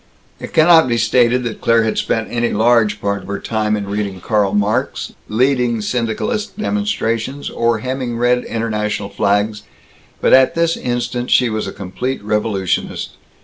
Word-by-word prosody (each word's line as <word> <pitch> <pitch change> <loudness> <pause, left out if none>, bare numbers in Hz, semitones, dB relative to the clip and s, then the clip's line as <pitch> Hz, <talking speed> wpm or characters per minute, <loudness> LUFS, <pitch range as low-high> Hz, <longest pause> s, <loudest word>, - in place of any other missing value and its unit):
It - - -8
cannot 160 -1 +6
be 120 -1 +1
stated 120 +2 +2
that 115 -2 -5
Claire 115 0 +3
had 110 - -1
spent 115 -1 -1
any 120 0 0
large 115 0 +2
part 100 -1 -2
of - - -13
her 100 0 -3
time 110 -1 -1
in 100 -1 -5
reading 100 -2 -3
Karl 105 +1 0
Marx, 105 +1 -1 0.2
leading 125 0 +1
syndicalist 120 - -2
demonstrations, 145 - -2
or 115 -2 0
hemming 130 -2 -3
red 125 +1 +2
internationalist 105 -3 -3
flags, 105 +1 +1 0.6
but - - +2
at 130 0 +5
this 165 0 +2
instant 120 0 -3
she 125 -3 +3
was 110 0 -2
a - - -4
complete 105 +7 -4
revolutionist. 105 -3 -1
115 Hz, 155 wpm, -18 LUFS, 105-125 Hz, 0.6 s, cannot